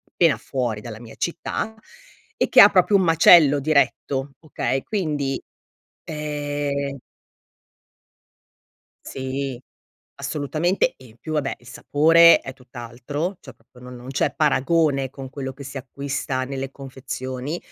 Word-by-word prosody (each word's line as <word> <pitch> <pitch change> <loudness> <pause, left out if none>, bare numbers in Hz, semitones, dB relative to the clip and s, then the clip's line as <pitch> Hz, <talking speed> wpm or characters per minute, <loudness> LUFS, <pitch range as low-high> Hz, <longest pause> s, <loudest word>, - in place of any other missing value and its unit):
pena 165 -3 +3
fuori 120 -6 -3
dalla 115 -3 -8
mia 115 -2 -12
città 180 +5 -3 0.6
e - - +1
che - - +8
ha - - +9
proprio 205 - +3
un 190 - +2
macello 165 -3 +6
diretto, 140 -1 0
okay, 135 -4 -3
quindi, 150 -9 -2 0.6
ehm 145 -2 -3 2.1
Sì, 130 -1 -4 0.6
assolutamente 155 - -1
e 130 - -17
in 110 0 -19
più 155 +5 -7
vabbè 145 -3 -1
il 120 - -21
sapore 165 +6 +5
è 130 - -8
tutt'altro, 130 - -6
cioè 130 -4 -13
proprio 125 +2 -22
non 125 0 -10
non 125 +2 -11
c'è 135 - 0
paragone 150 -2 +2
con 135 0 -10
quello 135 -2 -6
che 140 - -10
si 135 +1 -6
acquista 135 0 -4
nelle 135 0 -5
confezioni. 130 +2 -6
140 Hz, 130 wpm, -22 LUFS, 130-150 Hz, 2.1 s, ha